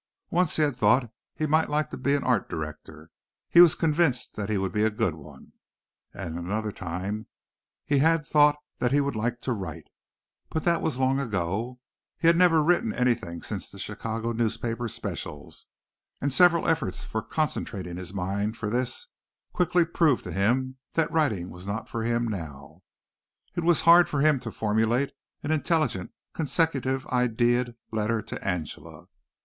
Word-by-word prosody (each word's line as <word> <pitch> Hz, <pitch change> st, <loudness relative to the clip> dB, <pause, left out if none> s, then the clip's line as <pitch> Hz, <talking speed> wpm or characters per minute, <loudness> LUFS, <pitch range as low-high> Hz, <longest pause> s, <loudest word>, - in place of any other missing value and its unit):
Once 175 Hz, -1 st, +2 dB
he 155 Hz, -, +3 dB
had 145 Hz, -4 st, +1 dB
thought 125 Hz, -2 st, +3 dB, 0.2 s
he 155 Hz, -, -1 dB
might 155 Hz, +2 st, +2 dB
like 150 Hz, +1 st, 0 dB
to -, -, -4 dB
be 140 Hz, +2 st, +1 dB
an 140 Hz, -, -1 dB
art 125 Hz, -6 st, +1 dB
director; 80 Hz, 0 st, -7 dB, 0.4 s
he 170 Hz, -, +7 dB
was 175 Hz, -3 st, +7 dB
convinced 160 Hz, -5 st, +1 dB
that 105 Hz, -1 st, -4 dB
he 105 Hz, -, +1 dB
would 95 Hz, -1 st, -1 dB
be 105 Hz, -, 0 dB
a 110 Hz, -, +4 dB
good 105 Hz, -5 st, 0 dB
one. 75 Hz, -3 st, -14 dB, 0.6 s
And 85 Hz, 0 st, -6 dB
another 105 Hz, +5 st, -2 dB
time 95 Hz, +5 st, -5 dB, 0.6 s
he 140 Hz, -1 st, +2 dB
had 160 Hz, +1 st, +3 dB
thought 150 Hz, -1 st, +5 dB, 0.3 s
he 140 Hz, +3 st, +3 dB
would 140 Hz, -3 st, -1 dB
like 120 Hz, +3 st, -2 dB
to 130 Hz, -, -1 dB
write, 95 Hz, -8 st, -6 dB, 0.6 s
but 160 Hz, -, -2 dB
that 170 Hz, -1 st, +2 dB
was 155 Hz, -6 st, -1 dB
long 130 Hz, +1 st, +2 dB
ago. 110 Hz, +1 st, -2 dB, 0.4 s
He -, -, -4 dB
had 170 Hz, +1 st, +7 dB
never 170 Hz, -3 st, +5 dB
written 175 Hz, +8 st, +2 dB
anything 115 Hz, -9 st, 0 dB
since -, -, -4 dB
the -, -, -13 dB
Chicago 115 Hz, +1 st, -4 dB
newspaper 115 Hz, +1 st, -1 dB
specials, 100 Hz, -9 st, -6 dB, 0.5 s
and 140 Hz, 0 st, -1 dB
several 170 Hz, +1 st, +5 dB
efforts 135 Hz, -, -1 dB
at 110 Hz, 0 st, -2 dB
concentrating 95 Hz, -, -2 dB
his 90 Hz, -1 st, -6 dB
mind 100 Hz, +3 st, -2 dB
for 105 Hz, -2 st, -3 dB
this 125 Hz, -, -1 dB, 0.5 s
quickly 175 Hz, -1 st, +2 dB
proved 165 Hz, -5 st, +2 dB
to 90 Hz, -, -6 dB
him 125 Hz, +8 st, 0 dB, 0.2 s
that 165 Hz, -, +1 dB
writing 110 Hz, -, 0 dB
was 90 Hz, +2 st, -10 dB
not 100 Hz, +2 st, -3 dB
for 115 Hz, -, -4 dB
him 120 Hz, +1 st, 0 dB
now. 80 Hz, -10 st, -7 dB, 0.7 s
It 175 Hz, -, -2 dB
was 170 Hz, -1 st, +4 dB
hard 170 Hz, +1 st, +7 dB
for 140 Hz, -, 0 dB
him 150 Hz, -2 st, +4 dB
to 115 Hz, -, -6 dB
formulate 110 Hz, +5 st, +1 dB, 0.3 s
an 145 Hz, -, -2 dB
intelligent 155 Hz, -, 0 dB, 0.2 s
consecutive 140 Hz, -4 st, 0 dB
idea'd 120 Hz, -1 st, +1 dB, 0.2 s
letter 110 Hz, 0 st, 0 dB
to -, -, -7 dB
Angela. 90 Hz, -6 st, -4 dB
120 Hz, 165 wpm, -26 LUFS, 100-150 Hz, 0.7 s, he